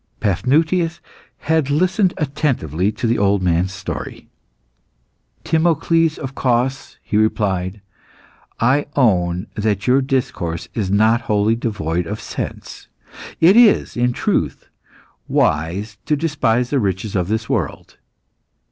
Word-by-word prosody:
Paphnutius 160 Hz, -, +1 dB, 0.4 s
had 160 Hz, -2 st, +1 dB
listened 185 Hz, +5 st, +2 dB
attentively 130 Hz, -, -1 dB
to 120 Hz, -, -5 dB
the 115 Hz, 0 st, +1 dB
old 100 Hz, -1 st, +2 dB
man's 90 Hz, +1 st, +1 dB
story. 85 Hz, -, -7 dB, 1.2 s
"Timocles 165 Hz, 0 st, +2 dB
of 135 Hz, -2 st, -6 dB
Cos," 130 Hz, +1 st, -1 dB
he 105 Hz, -, -1 dB
replied, 100 Hz, -3 st, 0 dB, 0.8 s
"I 135 Hz, +6 st, +2 dB
own 90 Hz, -8 st, +2 dB
that 105 Hz, -2 st, -1 dB
your 130 Hz, +2 st, +4 dB
discourse 125 Hz, -, -2 dB
is 105 Hz, -5 st, -2 dB
not 110 Hz, +4 st, +3 dB
wholly 105 Hz, +1 st, +2 dB
devoid 90 Hz, -8 st, -2 dB
of -, -, -4 dB
sense. -, -, -7 dB, 0.5 s
It 175 Hz, +5 st, +6 dB
is, 235 Hz, -3 st, +5 dB
in 125 Hz, 0 st, +1 dB
truth, -, -, -2 dB, 0.6 s
wise 95 Hz, +8 st, 0 dB
to 150 Hz, -, +2 dB
despise 140 Hz, -6 st, 0 dB
the 140 Hz, -, +2 dB
riches 100 Hz, -1 st, -2 dB
of 90 Hz, -2 st, 0 dB
this 110 Hz, +2 st, -2 dB
world. -, -, -3 dB
115 Hz, 120 wpm, -19 LUFS, 100-145 Hz, 1.2 s, It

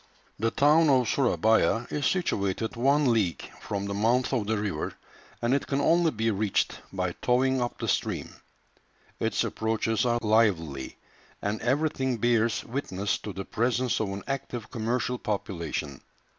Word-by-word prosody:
The 115 Hz, +2 st, +2 dB
town 150 Hz, +5 st, +4 dB
of 130 Hz, -3 st, +4 dB
Surabaya 115 Hz, -2 st, +2 dB
is 145 Hz, -, 0 dB
situated 110 Hz, -, -1 dB
one 135 Hz, +2 st, +3 dB
league 95 Hz, -7 st, 0 dB
from 100 Hz, -1 st, -4 dB
the 100 Hz, -, -3 dB
mouth 120 Hz, +6 st, +1 dB
of 115 Hz, -6 st, 0 dB
the 110 Hz, 0 st, +1 dB
river, 100 Hz, -7 st, -3 dB, 0.5 s
and 120 Hz, +2 st, +2 dB
it 140 Hz, -, 0 dB
can 135 Hz, -, 0 dB
only 165 Hz, +3 st, +4 dB
be 115 Hz, -4 st, 0 dB
reached 100 Hz, -1 st, 0 dB
by 90 Hz, -2 st, -1 dB
towing 130 Hz, +1 st, +2 dB
up 120 Hz, -, -2 dB
the -, -, -4 dB
stream. -, -, -1 dB, 0.9 s
Its -, -, +1 dB
approaches 110 Hz, 0 st, 0 dB
are 120 Hz, -1 st, +2 dB
lively, 95 Hz, -11 st, +1 dB, 0.4 s
and 105 Hz, +2 st, -2 dB
everything 130 Hz, -1 st, 0 dB
bears 115 Hz, 0 st, +2 dB
witness 105 Hz, -6 st, -2 dB
to 105 Hz, -, -6 dB
the 95 Hz, 0 st, -6 dB
presence 125 Hz, +2 st, 0 dB
of 105 Hz, -, -1 dB
an 100 Hz, 0 st, -5 dB
active 125 Hz, -4 st, -4 dB
commercial 120 Hz, +1 st, -1 dB
population. 85 Hz, -9 st, -3 dB
115 Hz, 150 wpm, -27 LUFS, 100-130 Hz, 0.9 s, town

